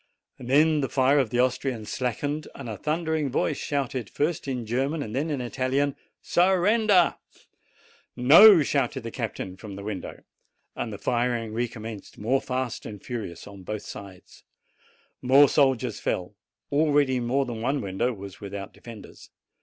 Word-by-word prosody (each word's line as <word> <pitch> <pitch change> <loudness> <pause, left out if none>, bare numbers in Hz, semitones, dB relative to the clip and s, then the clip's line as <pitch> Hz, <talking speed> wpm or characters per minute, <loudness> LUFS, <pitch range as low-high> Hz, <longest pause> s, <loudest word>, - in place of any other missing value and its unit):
Then 150 +5 +3
the 135 - -2
fire 135 +2 +3
of 130 -5 +1
the 120 - -1
Austrians 125 -3 -1
slackened, 145 +5 -2
and 135 - -8
a 110 - -4
thundering 155 - -1
voice 125 - 0
shouted, 130 -5 -2
first 155 +1 -2
in 125 -3 -3
German 135 +7 -1
and 110 +2 -6
then 150 +4 -1
in 145 -4 -2
Italian, 130 +3 -1 0.3
"Surrender!" 190 +2 +3 1.0
"No!" 160 - +8
shouted 135 -2 -1
the 115 - -6
captain 105 -6 -5
from 100 -1 -9
the 100 - -8
window. 105 -2 -6 0.5
And 115 - -4
the 100 - -6
firing 120 0 -1
recommenced 115 -3 -5
more 125 +6 +1
fast 130 -2 -3
and 105 -2 -8
furious 105 -7 -6
on 100 -1 -11
both 105 +3 -5
sides. 95 -2 -11 0.8
More 135 +3 +6
soldiers 130 -6 +1
fell. 90 +3 -3 0.4
Already 145 -3 +3
more 130 +3 0
than 120 -3 -6
one 135 +4 0
window 100 +4 -1
was 100 -4 -10
without 100 -1 -7
defenders. 115 -3 -12
125 Hz, 150 wpm, -26 LUFS, 110-145 Hz, 1.0 s, No